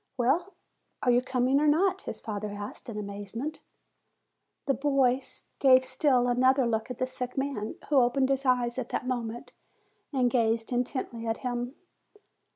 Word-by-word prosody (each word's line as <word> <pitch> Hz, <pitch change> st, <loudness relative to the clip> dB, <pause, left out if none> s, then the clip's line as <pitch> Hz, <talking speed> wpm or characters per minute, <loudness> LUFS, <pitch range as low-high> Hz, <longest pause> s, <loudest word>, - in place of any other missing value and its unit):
"Well, 295 Hz, +10 st, +1 dB, 0.5 s
are 250 Hz, -, +4 dB
you 245 Hz, +1 st, +4 dB
coming 255 Hz, +1 st, +1 dB
or 300 Hz, -, +2 dB
not?" 355 Hz, +6 st, +3 dB
his -, -, -6 dB
father 210 Hz, -1 st, -4 dB
asked, 205 Hz, +3 st, -7 dB
in 220 Hz, -, -6 dB
amazement. 205 Hz, +8 st, -5 dB, 1.0 s
The 275 Hz, -, +2 dB
boy 270 Hz, -2 st, +2 dB, 0.4 s
gave 260 Hz, -1 st, +6 dB
still 255 Hz, -3 st, +2 dB
another 255 Hz, +2 st, +3 dB
look 225 Hz, 0 st, -1 dB
at 250 Hz, -, -5 dB
the 255 Hz, -, 0 dB
sick 255 Hz, 0 st, -6 dB
man, 270 Hz, -6 st, -2 dB
who 290 Hz, -, +3 dB
opened 260 Hz, +1 st, +3 dB
his 275 Hz, 0 st, +1 dB
eyes 250 Hz, -1 st, +1 dB
at 250 Hz, -, -4 dB
that -, -, -2 dB
moment 240 Hz, 0 st, -4 dB, 0.6 s
and 255 Hz, -4 st, +2 dB
gazed 225 Hz, -1 st, +1 dB
intently 245 Hz, -2 st, -2 dB
at 225 Hz, -, -1 dB
him. 245 Hz, +2 st, -2 dB
250 Hz, 160 wpm, -28 LUFS, 235-270 Hz, 1.0 s, gave